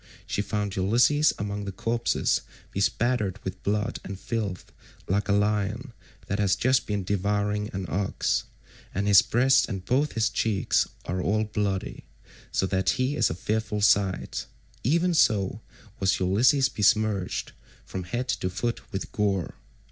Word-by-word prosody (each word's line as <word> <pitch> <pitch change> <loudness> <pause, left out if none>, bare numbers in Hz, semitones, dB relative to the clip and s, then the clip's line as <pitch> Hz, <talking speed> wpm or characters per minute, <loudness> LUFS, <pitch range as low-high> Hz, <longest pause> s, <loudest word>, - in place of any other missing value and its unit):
She - - -1
found 105 -1 -2
Ulysses 120 +10 +4
among 100 0 -4
the 100 - -4
corpses 115 +5 0 0.3
bespattered 105 0 0
with 95 0 -6
blood 105 +4 -1
and 95 0 -7
filth 100 -4 -4 0.4
like 100 +2 0
a - - +4
lion 105 +4 0 0.3
that 100 - -2
has 100 -2 +3
just 130 0 +2
been 105 -2 -1
devouring 105 +2 0
an 95 -1 -4
ox, 95 +5 -1 0.5
and 100 +2 0
his 100 -3 +8
breast 130 +3 +3
and 95 -2 -5
both 140 +7 +1
his 115 -1 +1
cheeks 105 -4 +1 0.2
are 90 +1 -2
all 105 +4 +1
bloody, 105 -3 -3 0.5
so - - +1
that 95 0 0
he 130 +3 0
is 115 -7 +2
a 80 - -3
fearful 105 +3 -2
sight; 100 -2 +2 0.4
even 170 +8 +2
so 105 - +2 0.4
was 95 -1 +2
Ulysses 120 +9 +4
besmirched 105 -5 +1 0.3
from 95 -2 -5
head 120 +7 -3
to 90 - -1
foot 115 +6 -4
with 95 - -4
gore. 100 -6 0
105 Hz, 150 wpm, -26 LUFS, 95-115 Hz, 0.5 s, his